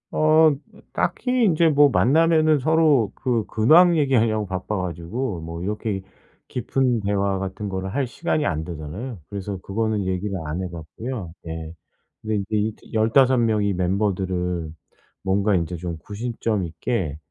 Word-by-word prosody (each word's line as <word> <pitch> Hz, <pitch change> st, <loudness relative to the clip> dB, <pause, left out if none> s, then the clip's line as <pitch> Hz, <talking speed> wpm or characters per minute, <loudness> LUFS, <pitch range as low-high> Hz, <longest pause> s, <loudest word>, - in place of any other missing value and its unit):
어 155 Hz, 0 st, +5 dB, 0.4 s
딱히 250 Hz, -2 st, +1 dB
인제 170 Hz, -3 st, +4 dB
뭐 145 Hz, -1 st, +6 dB
만나면은 155 Hz, +3 st, +4 dB
서로 150 Hz, -6 st, +3 dB
그 120 Hz, -4 st, -1 dB
근황 165 Hz, +10 st, +5 dB
얘기하려고 115 Hz, -7 st, +2 dB
바빠 95 Hz, +2 st, -3 dB
가지고 90 Hz, +4 st, -3 dB
뭐 85 Hz, +1 st, -6 dB
이렇게 105 Hz, 0 st, -2 dB, 0.5 s
깊은 125 Hz, 0 st, 0 dB
대화 100 Hz, -1 st, 0 dB
같은 95 Hz, +2 st, -4 dB
거를 95 Hz, 0 st, -4 dB
할 140 Hz, -2 st, 0 dB
시간이 155 Hz, +4 st, -1 dB
안 80 Hz, -, -1 dB
되잖아요. 90 Hz, -, -6 dB
그래서 100 Hz, 0 st, -5 dB
그거는 105 Hz, +1 st, -1 dB
얘기를 95 Hz, +2 st, -2 dB
안 80 Hz, +5 st, -3 dB
해 90 Hz, -, -4 dB
봤고요. 90 Hz, +5 st, -6 dB, 0.2 s
예 80 Hz, -1 st, -6 dB, 0.5 s
근데 110 Hz, 0 st, -2 dB, 0.2 s
이제 105 Hz, +1 st, -3 dB
15 125 Hz, +4 st, +4 dB
명의 110 Hz, -3 st, +2 dB
멤버들을 90 Hz, -2 st, -1 dB, 0.5 s
뭔가 100 Hz, +1 st, +2 dB
이제 85 Hz, 0 st, -1 dB
좀 85 Hz, -1 st, -5 dB
구심점 110 Hz, 0 st, -3 dB
있게 85 Hz, -, -3 dB
105 Hz, 280 characters per minute, -23 LUFS, 90-130 Hz, 0.5 s, 뭐